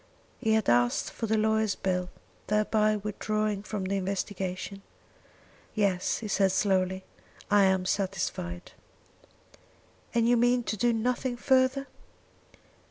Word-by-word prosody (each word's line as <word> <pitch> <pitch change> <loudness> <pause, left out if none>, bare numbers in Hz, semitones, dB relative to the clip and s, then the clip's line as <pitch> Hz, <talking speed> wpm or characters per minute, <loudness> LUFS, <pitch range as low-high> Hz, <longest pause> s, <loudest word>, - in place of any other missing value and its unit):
He 220 -3 +1
had 220 -2 +1
asked 120 0 +2
for 225 - -4
the 220 +1 +2
lawyer's 220 -1 +1
bill, 180 -1 -1 0.4
thereby 215 0 +2
withdrawing 210 0 -2
from 210 -1 -4
the 195 +1 -1
investigation. 190 0 -3 0.9
"Yes," 195 -4 +1
he 220 - -6
said 195 -1 +2
slowly; 190 -1 +1 0.5
"I 205 -1 +6
am 190 -1 +2
satisfied." 180 - -3 1.4
"And 230 -1 +3
you 240 0 +4
mean 245 +1 +3
to 220 - -2
do 240 +4 +2
nothing 245 +2 -1
further?" 260 +1 +2
205 Hz, 120 wpm, -28 LUFS, 190-220 Hz, 1.4 s, I